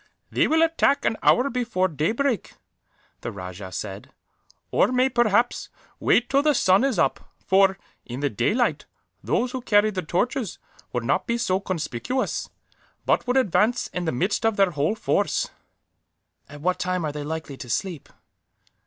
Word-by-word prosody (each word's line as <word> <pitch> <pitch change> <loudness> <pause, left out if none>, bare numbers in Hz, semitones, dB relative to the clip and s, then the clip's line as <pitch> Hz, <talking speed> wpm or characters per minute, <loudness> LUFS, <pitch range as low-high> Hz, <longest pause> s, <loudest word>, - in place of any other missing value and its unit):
"They - - +2
will 320 +1 +4
attack 320 -3 +2
an - - +2
hour 250 +3 +4
before 235 -7 0
daybreak," 220 - -1 0.7
the 120 - -5
rajah 95 -1 -8
said; 95 +1 -6 0.6
"or - - +4
may, 255 +1 +3
perhaps, 240 -1 +1 0.3
wait 245 - +3
till 275 +1 +3
the 300 0 +3
sun 190 +5 +4
is 270 -6 +1
up 135 - +2 0.3
for, 195 0 +4 0.3
in 125 +2 -7
the 145 0 0
daylight, 210 - 0 0.4
those 245 +1 0
who 260 - -4
carried 215 -2 +3
the 185 - -2
torches 220 - -1 0.3
would 120 -1 -2
not 130 - 0
be 235 - 0
so 190 -5 +1
conspicuous, 185 - -3 0.6
but - - +1
would 250 +2 +2
advance 235 0 +2
in 180 -1 -2
the 160 - 0
midst 190 - -1
of 225 -1 +2
their 195 -2 +4
whole 150 +6 0
force." - - 0 1.0
"At 145 0 -11
what 180 +3 0
time 180 -2 -1
are 150 - -2
they 145 0 -5
likely 160 -1 -5
to 125 - -9
sleep?" 170 - -3
195 Hz, 160 wpm, -24 LUFS, 150-245 Hz, 1.0 s, will